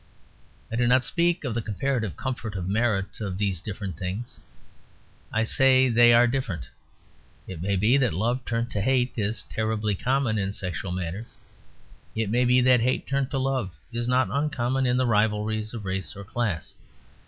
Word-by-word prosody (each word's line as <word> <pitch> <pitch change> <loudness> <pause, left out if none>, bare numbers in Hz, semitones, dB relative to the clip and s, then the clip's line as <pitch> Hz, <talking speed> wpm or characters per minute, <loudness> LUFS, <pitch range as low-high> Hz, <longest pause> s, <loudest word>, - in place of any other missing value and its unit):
I - - -2
do 120 0 +2
not 130 +1 +4
speak 175 -1 +1
of 130 -5 -2
the 115 - -1
comparative 110 -1 -2
comfort 125 -5 -4
or 95 - -3
merit 100 0 0
of 100 -4 -3
these 100 -4 -1
different 100 -5 -5
things: 100 +6 -5 0.9
I 110 - +1
say 130 +2 +4
they 120 0 +6
are 120 +1 +6
different. 120 - -2 0.8
It 90 -4 -7
may 100 +2 0
be 110 +8 +4
that 125 -4 +2
love 120 +9 -1
turned 120 +1 -2
to 105 - -1
hate 125 +2 +1
is 105 -2 -2
terribly 110 +5 -1
common 125 +1 0
in 100 0 -1
sexual 90 -1 -4
matters: 90 +5 -5 0.8
it 110 -2 -1
may 125 +2 +3
be 125 +1 +4
that 125 0 +5
hate 130 +2 0
turned 135 -1 -1
to 135 - -2
love 130 - -1 0.2
is 120 0 -2
not 125 -4 +2
uncommon 135 -2 0
in 125 0 +2
the 130 - +2
rivalries 110 -1 +1
of 110 -4 -7
race 95 -3 -3
or 100 - -8
class. 100 -5 -3
115 Hz, 175 wpm, -26 LUFS, 100-125 Hz, 0.9 s, they